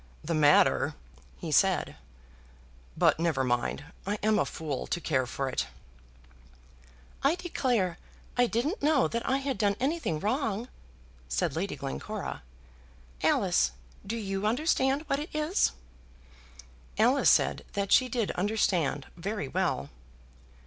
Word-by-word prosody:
"The 165 - -2
matter!" 150 -2 +4 0.4
he - - -5
said. - - +3 1.0
"But - - +4
never 160 -6 +1
mind; 120 +3 -1 0.2
I 205 +1 0
am 215 0 +3
a - - +2
fool 150 -5 -4
to - - -1
care 130 -6 0
for 135 +1 -3
it." 130 - -1 1.5
"I 280 +5 +3
declare 245 - -1 0.4
I 245 0 +4
didn't 250 - -1
know 295 -2 +3
that 235 0 -3
I 265 - +3
had 275 -2 -3
done 200 -2 +2
anything 270 - -1
wrong," 225 - -1 0.6
said 65 - 0
Lady - - -2
Glencora. 65 0 -5 0.8
"Alice, 60 0 +2 0.3
do 225 +4 -4
you 195 -1 -2
understand 270 +3 +1
what 275 - 0
it 300 - -5
is?" 305 +5 +2 1.3
Alice - - +4
said - - +3
that 200 -1 -2
she 255 -1 +5
did 230 -4 -1
understand 180 -8 0
very 195 -2 -3
well. 165 - -1
205 Hz, 130 wpm, -29 LUFS, 155-260 Hz, 1.5 s, she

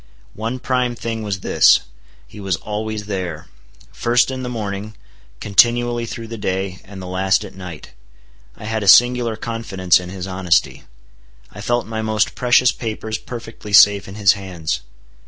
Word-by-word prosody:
One 115 +4 -4
prime 125 -1 -1
thing 115 -1 -4
was 100 -4 -4
this,—he - - +1
was 95 -3 -1
always 105 +2 -5
there;—first 90 - -2
in 130 0 -5
the 125 - -4
morning, 105 -2 -5 0.4
continually 120 +3 +2
through 115 0 -6
the 115 0 -8
day, 95 -1 -3
and 100 0 -11
the 95 - -7
last 95 +2 +1
at 100 - -11
night. 90 -4 -10 0.7
I - - -12
had 110 0 -2
a 100 - -3
singular 120 +1 +5
confidence 105 -6 0
in 90 0 -8
his 95 -1 -6
honesty. 95 -3 0 0.7
I 105 - -10
felt 120 +2 0
my 110 0 -4
most 110 -1 0
precious 125 0 +4
papers 110 -1 -5
perfectly 115 -3 -9
safe 100 +2 +6
in 95 - -9
his 100 -3 +5
hands. 90 -5 -4
105 Hz, 155 wpm, -19 LUFS, 95-115 Hz, 0.7 s, safe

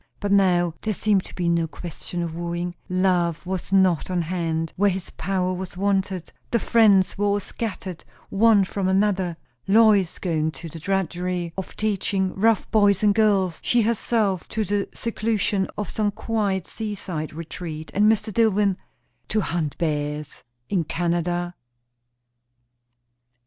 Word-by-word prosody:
But 205 -1 -2
now 180 -4 +3
there 215 -2 -1
seemed 200 -2 +2
to - - -11
be 175 -2 -1
no 170 -1 +2
question 175 +1 -6
of 165 -2 -4
wooing; 175 +1 -3 0.2
Love 180 -3 +1
was 185 0 -4
not 190 -4 +3
on 180 -2 0
hand, 165 -2 -2
where 205 +2 +3
his 185 -1 -4
power 185 0 -1
was 185 -1 -6
wanted; 190 -2 -1 0.2
the 235 - +2
friends 205 -5 +4
were 205 - +2
all 200 0 +2
scattered 190 -4 -5 0.3
one 210 0 +5
from 190 0 -2
another 190 -3 +1 0.3
Lois 205 -3 +4
going 160 -4 0
to 165 - -8
the 165 - -9
drudgery 180 -1 -2
of 190 - -6
teaching 195 -2 0
rough 220 +1 +2
boys 205 -2 +4
and 205 -1 +5
girls, 200 -5 +2
she 240 -1 +3
herself 215 -4 0
to 220 - -1
the 200 +1 -1
seclusion 215 -4 -1
of 210 - -3
some 215 -1 0
quiet 205 -3 -1
seaside 195 -8 -4
retreat, 160 0 -7
and 210 +2 +5
Mr. 220 -1 -1
Dillwyn 205 -4 +3 0.5
to 215 - +1
hunt 165 -6 -2
bears? 150 -2 -2 0.3
in 180 -4 0
Canada. 175 +2 -1
190 Hz, 145 wpm, -24 LUFS, 175-205 Hz, 0.5 s, one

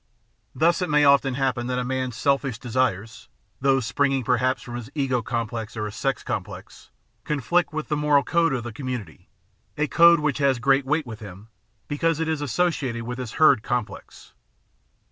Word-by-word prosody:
Thus 165 +6 +2
it 180 - -1
may 150 -1 +4
often 140 -2 +4
happen 130 -3 -1
that 125 0 -2
a 125 - -1
man's 130 -1 -3
"selfish" 135 -2 0
desires, 115 -3 -2 0.3
those 135 -2 +2
springing 135 +2 0
perhaps 125 +2 0
from 120 - -8
his 120 -3 -7
ego 130 -4 0
complex 115 -1 -4
or 105 - -2
his 105 0 -6
sex 135 +5 -2
complex, - - -7 0.3
conflict 150 +5 0
with 155 0 -4
the 150 - -1
moral 150 -1 +3
code 165 +4 +2
of 125 -3 -2
the 120 -2 -7
com 130 +3 -7
munity, 100 -9 -6 0.5
a 150 - +1
code 170 +2 +6
which 150 -2 -1
has 140 -2 +2
great 135 +2 +2
weight 155 +1 +1
with 110 -3 -8
him 100 0 -11 0.4
because 160 +2 0
it 165 - -1
is 160 -2 -1
associated 135 -4 -1
with 125 +2 -6
his 125 -4 -6
herd 140 -6 +5
complex. 120 -1 -5
130 Hz, 185 wpm, -24 LUFS, 120-145 Hz, 0.5 s, code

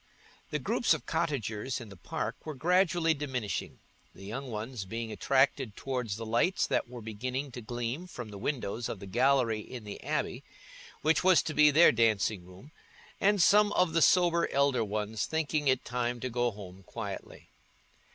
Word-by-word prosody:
The - - -1
groups - - +2
of - - -9
cottagers 125 -3 -2
in 115 -4 -10
the 100 - -11
park 90 - -5
were 155 -2 -6
gradually 175 +1 +2
diminishing, 130 -8 -4 0.4
the 95 - -11
young 130 +6 -5
ones 110 0 -5
being 115 +3 -5
attracted 130 0 +1
towards 125 -6 -3
the 115 +1 -6
lights 120 +12 +2
that - - -1
were 120 -2 -9
beginning 125 +6 -4
to 120 - -7
gleam 120 +8 -4
from 120 -10 -8
the 100 -1 -9
windows 120 -2 -3
of 105 - -5
the 100 - -8
gallery 120 +1 +2
in 120 +2 -8
the 105 -1 -8
abbey, - - -2 0.6
which 160 +3 +3
was 185 -1 +5
to 155 - -3
be 150 -1 +6
their 160 +4 +7
dancing 110 -5 +1
room, 95 +11 -14 0.5
and 200 -2 +4
some 210 +2 +5
of 180 -3 +2
the 165 - +3
sober 175 -1 +4
elder 140 -4 +2
ones 105 0 -2
thinking 155 -2 -1
it 130 -1 +2
time 120 0 -2
to 130 - -3
go 120 +1 +1
home 95 -3 -10
quietly. 95 - -8
125 Hz, 175 wpm, -30 LUFS, 110-150 Hz, 0.6 s, their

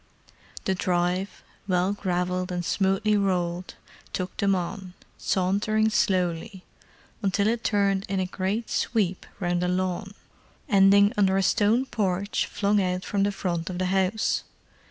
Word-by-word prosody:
The 190 - +2
drive, 180 +1 -1 0.2
well 185 +1 +1
gravelled 180 -1 -2
and 175 -1 -3
smoothly 195 +3 +1
rolled, 180 -2 -1 0.4
took 185 0 -3
them 200 -1 +2
on, 185 +1 -5 0.2
sauntering 205 +4 +1
slowly, 190 -3 0 0.6
until 200 0 +1
it 230 +1 0
turned 200 -2 +1
in 195 -1 0
a 185 - 0
great 195 +5 -2
sweep 195 -6 0
round 175 -1 0
a 180 - +1
lawn, 185 +2 -2 0.5
ending 200 -2 +5
under 195 -2 +3
a 195 - +2
stone 225 +6 +3
porch 200 -4 -1
flung 205 0 +1
out 180 0 -1
from 200 - -1
the 200 +1 +2
front 175 -4 -3
of 180 - -4
the 185 - 0
house. 195 +3 +1
190 Hz, 140 wpm, -26 LUFS, 180-205 Hz, 0.6 s, ending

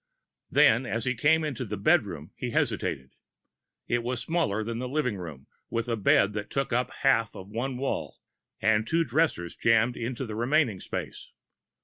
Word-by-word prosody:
Then, 120 +4 +4
as 115 -1 -2
he 125 - +1
came 150 +7 +3
into 135 -5 -3
the 105 -3 -4
bedroom, 100 - +1
he - - -4
hesitated. 65 -1 -1 0.7
It 120 0 +1
was 125 0 -2
smaller 145 -12 0
than 115 +1 -4
the 125 0 -3
living 135 -5 0
room, 80 -8 -8 0.2
with 115 +1 -2
a 115 - 0
bed 105 0 +3
that 105 0 -4
took 135 -3 -1
up 125 +1 +1
half 115 -5 +1
of 95 +1 -9
one 125 +4 -3
wall, 135 +1 -3 0.4
and 110 +1 +2
two 165 +4 +2
dressers 130 - 0
jammed 115 +1 +3
into 125 +3 -4
the 110 - -6
remaining 120 -2 +1
space. - - -6
115 Hz, 170 wpm, -28 LUFS, 110-135 Hz, 0.7 s, Then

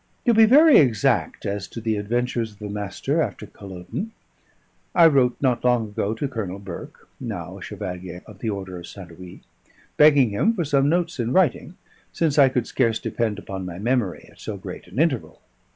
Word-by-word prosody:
To 240 - +5
be 220 0 +7
very 295 +6 +7
exact 120 - +1
as 100 -1 -3
to - - -8
the 110 -1 -1
adventures 115 +1 -2
of - - -22
the 105 -1 -7
Master 100 -1 -2
after - - -3
Culloden, 100 - -7 0.8
I 170 - +7
wrote 135 -6 +4
not 125 -4 +1
long 120 -3 +2
ago 105 +1 -2
to 140 +5 -2
Colonel 105 -8 -5
Burke, 95 -3 -10
now - - -6
a - - -15
Chevalier 90 -1 -7
of - - -14
the 115 - -2
Order 95 -3 -5
of 85 - -10
St. 95 -4 -11
Louis, 90 -1 -11 0.6
begging 145 -6 +6
him 220 - +1
for 175 -5 -1
some 140 -1 +2
notes 170 -2 0
in 120 +1 -1
writing, 175 0 +1 0.3
since 155 -3 +1
I 135 -2 +7
could 125 -2 -1
scarce 115 -3 +1
depend 110 -3 -2
upon 95 -2 -6
my 90 -1 -6
memory 115 -2 -1
at - - -22
so - - -6
great - - -9
an - - -12
interval. 150 -5 0
115 Hz, 190 wpm, -23 LUFS, 100-140 Hz, 0.8 s, be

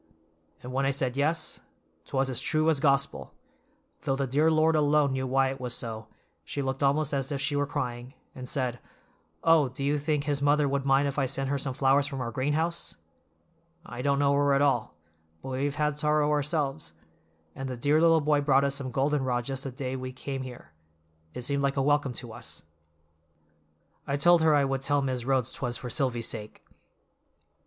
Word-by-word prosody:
'" - - -36
"And 125 +1 -7
when 135 +1 0
I - - +2
said 130 -2 -1
yes, 155 +3 0 0.5
'twas 135 0 0
as 130 -3 -1
true 155 +1 +2
as 150 - +1
Gospel, 140 -1 0 0.7
though 135 - 0
the 135 0 -1
dear 145 +5 +2
Lord 160 0 +3
alone 150 -2 +3
knew 130 0 -2
why 135 +1 +2
it 135 -1 -8
was 125 -1 -2
so, 110 -2 -5 0.4
she 140 - -4
looked 130 +1 -3
almost 145 +1 +2
as 135 0 -1
if 140 - -2
she 145 +2 0
were 145 0 +1
crying, 125 -3 -4 0.2
and 125 -1 -7
said, 125 -4 -2 0.6
'Oh, 160 -5 +5
do 130 +2 -6
you 145 +1 +1
think 150 0 0
his 145 -2 -1
mother 145 0 +3
would 140 0 -1
mind 135 +1 +4
if 140 +1 -2
I 135 - +1
sent 135 +1 -2
her 140 - 0
some 135 -1 -3
flowers 140 +1 +3
from 135 -1 -5
our 120 -2 -3
greenhouse? 150 +7 -1 0.9
I 120 -6 -7
don't 140 +1 +1
know 140 0 +3
her 140 0 +3
at 140 - +2
all, 135 -6 +1 0.5
but - - -6
we 130 +2 -1
have 145 0 -2
had 150 -1 0
sorrow 150 -1 +2
ourselves; 145 - -1 0.6
and 135 0 -5
the 125 - -5
dear 145 +6 +2
little 165 -1 +5
boy 150 0 +2
brought 140 -1 +3
us 140 -1 +1
some 140 -2 -5
golden 135 +3 0
rod 120 -2 -1
just 135 0 -4
the 135 - -4
day 130 0 -4
we 130 0 -5
came 135 +1 -5
here—it 80 - -12
seemed 140 +2 -1
like 140 0 0
a - - +3
welcome 145 -2 +2
to 120 -1 -6
us." 120 -7 -8 1.4
"I 140 - 0
told 175 +3 +5
her 160 -1 +4
I 140 -1 +3
would 135 0 -1
tell 145 +1 +1
Mis' 130 -3 -2
Rhodes 130 -2 +1
'twas 120 -2 -3
for 125 - -7
Silvy's 120 -4 0
sake." 105 -2 -6
135 Hz, 205 wpm, -28 LUFS, 130-145 Hz, 1.4 s, Oh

